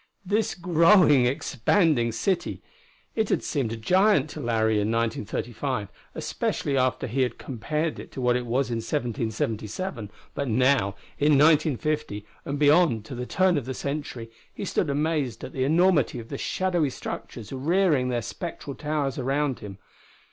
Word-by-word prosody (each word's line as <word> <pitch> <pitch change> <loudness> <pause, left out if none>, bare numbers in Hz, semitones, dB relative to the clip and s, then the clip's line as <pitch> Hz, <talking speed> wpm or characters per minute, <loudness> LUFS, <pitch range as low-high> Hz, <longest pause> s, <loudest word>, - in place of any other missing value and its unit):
This 210 +3 0
growing, 170 -6 +5
expanding 135 - +1
city! 170 - -1 0.5
It 220 -2 0
had - - +1
seemed 135 -7 -1
a 115 - -4
giant 180 - +3
to - - -7
Larry 110 -2 +1
in 105 +2 0
1935, 115 +1 -2 0.3
especially 140 - -2
after 130 -1 +1
he 130 +3 -1
had 125 - 0
compared 150 +6 -3
it - - -10
to - - -6
what 125 -1 +2
it 125 -1 -2
was 125 +2 0
in 115 - -1
1777. 115 - -3 0.2
But 140 - -3
now, 125 -4 +2 0.2
in 150 +1 +4
1950, 150 -6 +2 0.2
and 140 - -3
beyond 145 -6 +4
to 120 - -8
the 125 0 -5
turn 185 -4 +2
of 130 - -10
the 130 0 -4
century, 140 -5 -5 0.2
he - - -6
stood 175 - 0
amazed 145 -4 -1
at - - -7
the 130 -1 0
enormity 160 -3 +3
of 115 -1 -8
the - - -4
shadowy 175 -6 0
structures 115 -2 -7
rearing 150 -1 +2
their 120 -2 -1
spectral 150 - -6
towers 150 -3 -2
around 135 +1 0
him. 100 -2 -9
135 Hz, 155 wpm, -26 LUFS, 115-155 Hz, 0.5 s, growing